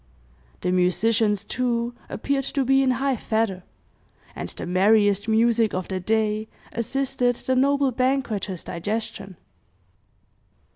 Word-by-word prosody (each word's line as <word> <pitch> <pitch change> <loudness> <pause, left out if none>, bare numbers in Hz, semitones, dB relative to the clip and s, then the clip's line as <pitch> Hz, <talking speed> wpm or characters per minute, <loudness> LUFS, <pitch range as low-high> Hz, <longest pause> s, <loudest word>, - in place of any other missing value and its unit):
The 180 - 0
musicians, 205 +3 +2
too, 240 -1 -1 0.2
appeared 275 +3 -1
to 275 -2 +1
be 270 +1 +4
in 265 - +2
high 270 0 +1
feather, 220 -5 -1 0.7
and - - -5
the - - -7
merriest 205 +2 +3
music 225 -1 +3
of 185 -1 -4
the 190 -1 -2
day 215 +2 0 0.2
assisted 250 +1 0
the 260 +2 -1
noble 275 +1 +3
banqueters' 245 -8 -1
digestion. 195 0 -5
225 Hz, 115 wpm, -24 LUFS, 205-255 Hz, 0.7 s, be